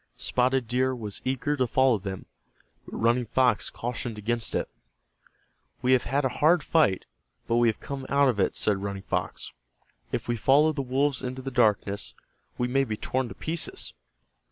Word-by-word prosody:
Spotted 125 Hz, -1 st, +1 dB
Deer 130 Hz, +2 st, +1 dB
was 105 Hz, -4 st, -5 dB
eager 135 Hz, +3 st, 0 dB
to 130 Hz, -3 st, +1 dB
follow 130 Hz, -1 st, +3 dB
them, 95 Hz, -1 st, -6 dB, 0.6 s
but -, -, -7 dB
Running 120 Hz, +1 st, +2 dB
Fox 125 Hz, -2 st, +2 dB
cautioned 120 Hz, -1 st, -4 dB
against 115 Hz, +2 st, -2 dB
it. -, -, 0 dB, 1.2 s
"We 125 Hz, -, +3 dB
have 130 Hz, -1 st, +4 dB
had 140 Hz, +2 st, 0 dB
a -, -, +2 dB
hard 160 Hz, +2 st, +5 dB
fight, 150 Hz, -, +2 dB, 0.4 s
but 115 Hz, -, +1 dB
we 120 Hz, 0 st, +4 dB
have 110 Hz, -, 0 dB
come 140 Hz, -1 st, -6 dB
out 140 Hz, 0 st, +4 dB
of 120 Hz, -6 st, +1 dB
it," 95 Hz, -, +1 dB
said 100 Hz, -2 st, +1 dB
Running 100 Hz, -1 st, -4 dB
Fox. -, -, -3 dB, 0.6 s
"If -, -, -3 dB
we 120 Hz, 0 st, 0 dB
follow 145 Hz, +7 st, +4 dB
the 150 Hz, -2 st, -3 dB
wolves 135 Hz, +1 st, 0 dB
into 130 Hz, 0 st, -5 dB
the 135 Hz, -, -4 dB
darkness 105 Hz, -4 st, +1 dB, 0.4 s
we 125 Hz, -, 0 dB
may 135 Hz, +2 st, +2 dB
be 110 Hz, -5 st, -3 dB
torn 130 Hz, +1 st, -2 dB
to -, -, -9 dB
pieces." 160 Hz, 0 st, -3 dB
125 Hz, 180 wpm, -27 LUFS, 115-135 Hz, 1.2 s, hard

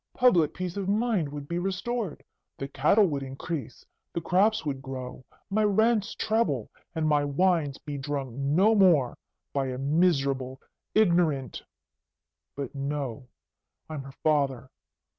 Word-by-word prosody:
Public 180 Hz, -, +4 dB
peace 180 Hz, 0 st, -4 dB
of 195 Hz, -1 st, -2 dB
mind 210 Hz, -7 st, +1 dB
would 145 Hz, -1 st, -7 dB
be 170 Hz, +2 st, -2 dB
restored. 195 Hz, +1 st, -3 dB, 0.3 s
The 135 Hz, -, -4 dB
cattle 150 Hz, +10 st, +4 dB
would 145 Hz, -6 st, -1 dB
increase, 135 Hz, +1 st, -6 dB, 0.3 s
the 170 Hz, -, -1 dB
crops 190 Hz, +4 st, +2 dB
would 135 Hz, -2 st, -2 dB
grow, 130 Hz, -1 st, -7 dB, 0.3 s
my 215 Hz, +2 st, +2 dB
rents 215 Hz, +1 st, +2 dB
treble, 215 Hz, -, 0 dB, 0.2 s
and 160 Hz, -1 st, 0 dB
my 150 Hz, -1 st, +3 dB
wines 145 Hz, -1 st, +1 dB
be 145 Hz, -1 st, -6 dB
drunk 140 Hz, -2 st, -3 dB
no 150 Hz, +11 st, +3 dB
more 175 Hz, -, +4 dB, 0.4 s
by 135 Hz, -1 st, 0 dB
a 130 Hz, -1 st, -3 dB
miserable, 135 Hz, -3 st, +1 dB, 0.4 s
ignorant 170 Hz, -, +2 dB, 0.9 s
but, 140 Hz, -3 st, -5 dB
no! 140 Hz, -2 st, -4 dB, 0.6 s
I'm 155 Hz, -3 st, -4 dB
her 135 Hz, 0 st, -11 dB
father. 140 Hz, -4 st, +1 dB
150 Hz, 135 wpm, -27 LUFS, 135-185 Hz, 0.9 s, Public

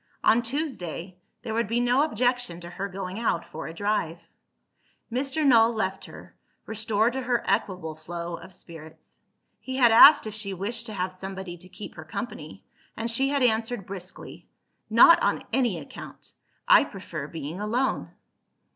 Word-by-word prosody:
On 230 Hz, -, +5 dB
Tuesday, 225 Hz, -, -5 dB, 0.2 s
there 220 Hz, -, -4 dB
would 230 Hz, -1 st, 0 dB
be 230 Hz, +3 st, 0 dB
no 245 Hz, +2 st, +3 dB
objection 245 Hz, -, 0 dB
to 175 Hz, 0 st, -9 dB
her 195 Hz, +3 st, -4 dB
going 190 Hz, +1 st, -5 dB
out 175 Hz, -7 st, 0 dB
for 160 Hz, -, -7 dB
a -, -, -7 dB
drive. 200 Hz, -4 st, -1 dB, 0.9 s
Mr. 275 Hz, +5 st, -1 dB
Null 230 Hz, -4 st, +6 dB
left 195 Hz, -4 st, -2 dB
her, -, -, -13 dB, 0.3 s
restored 220 Hz, +1 st, 0 dB
to 265 Hz, -, -2 dB
her 245 Hz, -1 st, 0 dB
equable 185 Hz, -5 st, -1 dB
flow 170 Hz, +2 st, -6 dB
of 170 Hz, +2 st, -12 dB
spirits. 160 Hz, -3 st, -12 dB, 0.4 s
He 260 Hz, 0 st, -5 dB
had 240 Hz, -3 st, +6 dB
asked 290 Hz, +5 st, +9 dB
if 215 Hz, -, -5 dB
she 205 Hz, -2 st, -4 dB
wished 225 Hz, +5 st, -4 dB
to 215 Hz, -, -6 dB
have 185 Hz, -1 st, -2 dB
somebody 190 Hz, -1 st, -7 dB
to 180 Hz, +2 st, -15 dB
keep 210 Hz, -, -9 dB
her -, -, -9 dB
company -, -, -7 dB, 0.3 s
and 230 Hz, +1 st, -2 dB
she 270 Hz, +4 st, +1 dB
had 280 Hz, -2 st, +1 dB
answered 225 Hz, -3 st, +1 dB
briskly, 185 Hz, -1 st, -9 dB, 0.4 s
"Not 285 Hz, +10 st, +7 dB
on -, -, +1 dB
any 240 Hz, -9 st, +1 dB
account! 145 Hz, -, -10 dB, 0.3 s
I -, -, +7 dB
prefer -, -, -7 dB
being 160 Hz, +3 st, -6 dB
alone." 240 Hz, +5 st, -1 dB
215 Hz, 165 wpm, -26 LUFS, 180-240 Hz, 0.9 s, asked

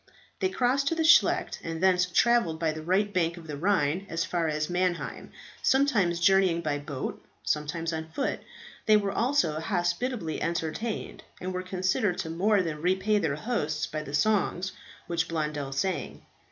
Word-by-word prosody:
They 380 Hz, -, +1 dB
crossed 270 Hz, -2 st, +1 dB
to 330 Hz, -, +1 dB
the 325 Hz, -, 0 dB
Scheldt, 340 Hz, -, +4 dB
and 165 Hz, -1 st, -4 dB
thence 180 Hz, 0 st, +3 dB
travelled 205 Hz, -3 st, +3 dB
by 165 Hz, -1 st, +1 dB
the 155 Hz, 0 st, -6 dB
right 195 Hz, +5 st, +1 dB
bank 170 Hz, -1 st, +1 dB
of 170 Hz, -, -10 dB
the 150 Hz, -2 st, -5 dB
Rhine 180 Hz, +1 st, +1 dB
as 165 Hz, 0 st, -1 dB
far 170 Hz, -2 st, -1 dB
as 155 Hz, 0 st, -1 dB
Mannheim, 180 Hz, -1 st, -2 dB, 0.3 s
sometimes 220 Hz, -11 st, +2 dB
journeying 185 Hz, -1 st, +4 dB
by 150 Hz, -3 st, -1 dB
boat, 140 Hz, -2 st, -5 dB, 0.2 s
sometimes 160 Hz, +2 st, -1 dB
on 160 Hz, 0 st, -4 dB
foot. 270 Hz, -, -2 dB, 0.5 s
They 215 Hz, -1 st, +7 dB
were 200 Hz, -1 st, -1 dB
also 195 Hz, -, +1 dB
hospitably 175 Hz, +1 st, -1 dB
entertained, 170 Hz, +7 st, -3 dB, 0.2 s
and 185 Hz, +1 st, -4 dB
were 180 Hz, -, -2 dB
considered 185 Hz, +1 st, 0 dB
to 160 Hz, -3 st, -3 dB
more 195 Hz, +4 st, +2 dB
than 155 Hz, -3 st, -4 dB
repay 190 Hz, +4 st, +2 dB
their 160 Hz, -7 st, 0 dB
hosts 155 Hz, -6 st, -2 dB
by 155 Hz, -, -4 dB
the 145 Hz, -1 st, -4 dB
songs 190 Hz, 0 st, +1 dB, 0.3 s
which 165 Hz, -1 st, -1 dB
Blondel 150 Hz, -4 st, -3 dB
sang. 180 Hz, +8 st, -3 dB
175 Hz, 165 wpm, -28 LUFS, 160-200 Hz, 0.5 s, They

